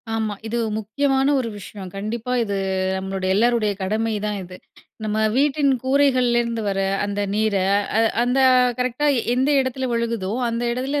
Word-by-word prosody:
ஆமா. 220 -2 -1
இது 235 +2 -2 0.2
முக்கியமான 270 +6 +1
ஒரு 240 -3 -2
விஷயம். 195 -1 -9
கண்டிப்பா 220 +4 -4
இது 200 -3 -3 0.4
நம்மளுடைய 190 0 -2
எல்லோருடைய 225 -1 +2
கடமைதான் 210 +1 -1
இது. 180 0 -11 0.5
நம்ம 215 0 -1 0.2
வீட்டின் 280 +1 +2
கூரைகள்லேருந்து 250 -4 +2
வர 195 0 -1 0.3
அந்த 205 0 -2
நீர, 215 -1 +1 0.4
அ - - +4 0.2
அந்த 250 +2 +1 0.4
கரெக்ட்டா 255 +4 0 0.3
எந்த 260 +3 +1
இடத்துல 260 0 -3
விழுகுதோ! 230 -4 -2 0.2
அந்த 230 +1 -2
இடத்துல 260 +4 -2
230 Hz, 135 wpm, -22 LUFS, 210-255 Hz, 0.5 s, அ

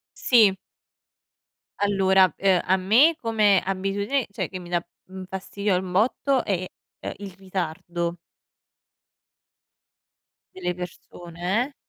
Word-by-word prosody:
Sì. 215 -6 +4 1.2
Allora 190 -3 +3
ehm, 190 -2 +3
a 185 - +3
me 235 - +4
come 215 -5 +3
abitudine, 200 +7 -1
cioè - - -4
che 185 - -6
mi 175 - -11
dà 175 -1 0 0.5
fastidio 195 +1 -2
un 185 0 -4
botto 250 +6 +1
è, 185 -3 -1 0.3
ehm, - - -5
il 200 -1 -8
ritardo 175 -2 -4 2.4
delle 180 -1 -3
persone 175 +4 -4
eh. 290 - -20
190 Hz, 105 wpm, -24 LUFS, 180-205 Hz, 2.4 s, Sì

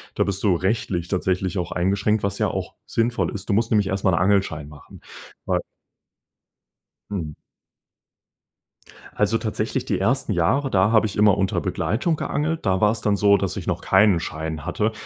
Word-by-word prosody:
da - - +2
bist 100 -1 -2
du 100 -4 +3
rechtlich 95 -2 -1
tatsächlich 95 0 -1
auch 90 - -3
eingeschränkt, 100 +4 +1
was 100 0 -1
ja - - +2
auch - - -5
sinnvoll 115 +1 0
ist. 95 - -7
Du - - +2
musst 115 +3 +1
nämlich 105 -3 +3
erst 95 0 -2
mal 95 - +4
'n 85 - +2
Angelschein 95 -6 +1
machen, 75 -1 -14 0.4
wei - - +1 1.5
Mhm. 85 -7 -4 1.8
Also, - - +2
tatsächlich, - - -3
die - - -1
ersten 130 -2 0
Jahre, 115 +11 +1
da 95 -1 +3
habe 110 -1 +4
ich 105 - -8
immer 105 -2 +5
unter 95 -1 0
Begleitung 160 +10 -1
geangelt. 155 +2 -2
Da 95 -1 +2
war's 110 +1 +2
dann 105 -1 +1
so, 100 0 +4
dass 95 -2 -3
ich - - -5
noch - - -1
keinen 95 -2 +4
Schein 80 -1 -5
hatte. 105 +5 0
100 Hz, 175 wpm, -23 LUFS, 90-110 Hz, 1.8 s, immer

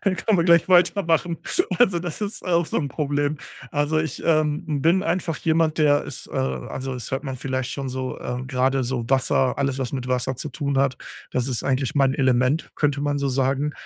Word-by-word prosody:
Könn 195 -2 +1
können 195 +2 +1
wir 170 - +3
gleich 170 0 +5
weitermachen. 175 -2 +3 0.4
Also 190 -8 +4
das 175 +1 -5
ist 205 0 -4
auch 170 -2 +2
so - - -4
'n 145 - -1
Problem. 145 +1 -1 0.3
Also 145 +2 +1
ich, 155 -3 -3
ähm, 155 -1 +1
bin 175 +4 +3
einfach 175 -5 -1
jemand, 160 0 +1
der 145 -2 +4
ist, - - -8
äh - - -15
also 65 - -3
es 125 -4 -6
hört 135 +3 -2
man 135 - -4
vielleicht 130 -1 -3
schon 135 -1 -4
so, 130 0 -4
äh, 125 0 -4
gerade 130 0 +1
so 120 -1 -2
Wasser 130 -1 +2
alles 135 -1 -1
was 125 - -2
mit 130 -2 -3
Wasser 125 0 -1
zu 150 - -5
tun 140 -3 -2
hat, 135 -2 +2 0.4
das 125 +1 0
ist 125 - -2
eigentlich 135 0 0
mein 135 -1 +3
Element, 130 +3 +1
könnte 145 -2 +1
man 145 0 0
so 140 - -1
sagen 135 +2 0
140 Hz, 210 wpm, -23 LUFS, 130-160 Hz, 0.4 s, gleich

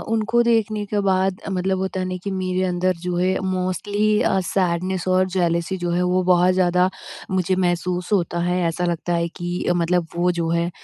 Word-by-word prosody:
उनको 225 +2 +2
देखने 220 -3 +1
के 205 0 -1
बाद 190 0 +2
मतलब 190 0 0
होता 190 0 -2
है 185 - -2
ना, 185 0 -3
कि 200 - -2
मेरे 185 -1 -1
अंदर 180 0 0
जो 180 -1 -2
है 185 +1 +1
मोस्टली 205 +3 0
अ, 190 - +2
सैडनेस 185 0 -1
और 185 0 +3
जेलसी 170 +1 0
जो 175 - 0
है 175 +1 +1
वो 180 +1 +1
बहुत 180 0 +4
ज़्यादा 180 0 +3 0.4
मुझे 185 0 +1
महसूस 180 +1 -1
होता 175 -3 +1
है 180 +1 +1
ऐसा 170 +2 -2
लगता 175 0 -1
है 170 0 0
कि 175 0 -3
मतलब 175 0 +1
वो 180 +1 +2
जो 165 -1 0
है 170 +1 0
185 Hz, 195 wpm, -22 LUFS, 175-190 Hz, 0.4 s, बहुत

